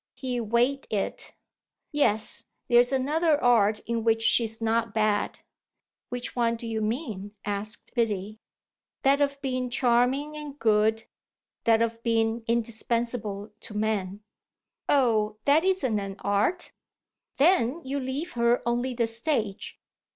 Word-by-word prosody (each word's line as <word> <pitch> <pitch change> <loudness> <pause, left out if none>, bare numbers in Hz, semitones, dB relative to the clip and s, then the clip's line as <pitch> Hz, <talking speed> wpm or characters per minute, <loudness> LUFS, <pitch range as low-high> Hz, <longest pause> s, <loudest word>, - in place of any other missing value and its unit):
He 255 -1 -3
weighed 240 +5 +1
it. 205 -2 -3 0.6
"Yes, 220 -7 +2 0.2
there's 245 +1 +5
another 295 +4 +2
art 220 -5 +3
in 230 -1 -2
which 225 0 +2
she's 225 -1 +2
not 225 0 0
bad." 215 -1 0 0.7
"Which 245 0 -5
one 235 -1 +1
do 230 - -7
you 225 -1 -2
mean?" 215 - -3
asked 205 +1 -3
Biddy. 215 -3 -1 0.6
"That 275 +1 +4
of 280 -1 +1
being 255 -1 -1
charming 255 +4 +1
and 295 -2 -7
good, 220 -1 +2 0.6
that 225 0 +4
of 230 0 -3
being 225 0 +1
indispensable 230 -2 -2
to 210 - -8
man." 205 -2 -1 0.7
"Oh 220 -6 +2
that 295 +3 +5
isn't 320 - +1
an 195 -1 -5
art." 205 - 0 0.7
"Then 315 -1 +3
you 275 +2 -2
leave 275 +6 -4
her 235 0 +2
only 245 +1 -1
the 235 -1 +2
stage. 225 -3 -2
235 Hz, 130 wpm, -27 LUFS, 220-260 Hz, 0.7 s, there's